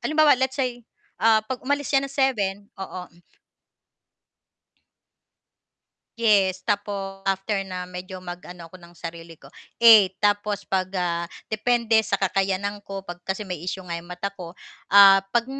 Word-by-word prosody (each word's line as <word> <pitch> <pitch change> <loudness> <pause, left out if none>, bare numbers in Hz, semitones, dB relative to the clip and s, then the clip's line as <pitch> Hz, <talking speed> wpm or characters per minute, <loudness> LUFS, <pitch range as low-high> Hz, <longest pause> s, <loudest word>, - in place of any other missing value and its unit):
Halimbawa 310 -1 +4
let's 260 +1 0
say, 250 -3 -2 0.4
ah, 220 -1 +4
'pag 250 +3 -5
umalis 285 +2 -2
siya 275 - +5
ng 275 - -5
7, 240 -9 +1 0.2
oo, 190 -1 -6
hmm. 170 - -23 3.0
Yes, 195 -5 +3
tapos 200 -2 -3
after 195 +1 -1
na 185 -1 -6
medyo 180 +1 -8
mag-ano 175 -1 -9
ako 175 +3 -14
ng 170 0 -16
sarili 165 -1 -9
ko, - - -16 0.3
8, 215 -5 +7
tapos 205 0 0
'pag, 185 -1 -1
ah, 170 -1 -1 0.2
depende 230 +1 0
sa 200 -2 -1
kakayanan 195 +1 -1
ko, 195 -1 -7
'pag 175 0 -8
kasi 195 +3 -4
may 180 -4 -5
issue 185 +1 -5
nga 170 - -4
'yong 170 +1 -8
mata 180 +2 -4
ko, 175 -3 -9 0.4
ah, 195 -1 +8
'pag 235 +1 +1
195 Hz, 150 wpm, -24 LUFS, 180-220 Hz, 3.0 s, ah